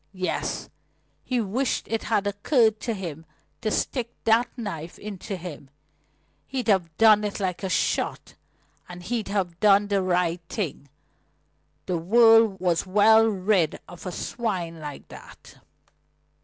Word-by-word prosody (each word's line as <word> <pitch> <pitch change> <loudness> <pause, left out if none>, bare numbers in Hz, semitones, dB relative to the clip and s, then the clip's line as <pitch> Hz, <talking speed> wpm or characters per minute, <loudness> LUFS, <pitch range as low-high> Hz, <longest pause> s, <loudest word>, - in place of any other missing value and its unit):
Yes: 185 0 -2 0.6
he 250 -1 -1
wished 235 +5 -1
it 225 -1 -2
had 210 -3 +1
occurred 220 +2 +2
to 230 - -3
him 165 -5 -6 0.4
to 220 - 0
stick 235 +2 -1
that 225 +2 +3
knife 170 -8 -6
into 200 -1 -6
him. 160 -6 -9 0.8
He'd 255 -4 -4
have 175 -6 +1
done 215 -2 +6
it 210 0 -3
like 185 -3 -2
a 190 - -3
shot, - - -1 0.6
and 180 0 -9
he'd 225 +2 -3
have 185 -4 -2
done 205 -1 +4
the 200 -1 +2
right 180 -2 0
thing. 155 - -4 1.0
The 180 -2 -1
world 225 +2 +5
was 175 -1 0
well 220 +3 +5
rid 190 -5 +1
of 175 +1 -10
a - - -3
swine 180 -6 -3
like 150 -2 -8
that! - - -14
200 Hz, 140 wpm, -25 LUFS, 175-220 Hz, 1.0 s, done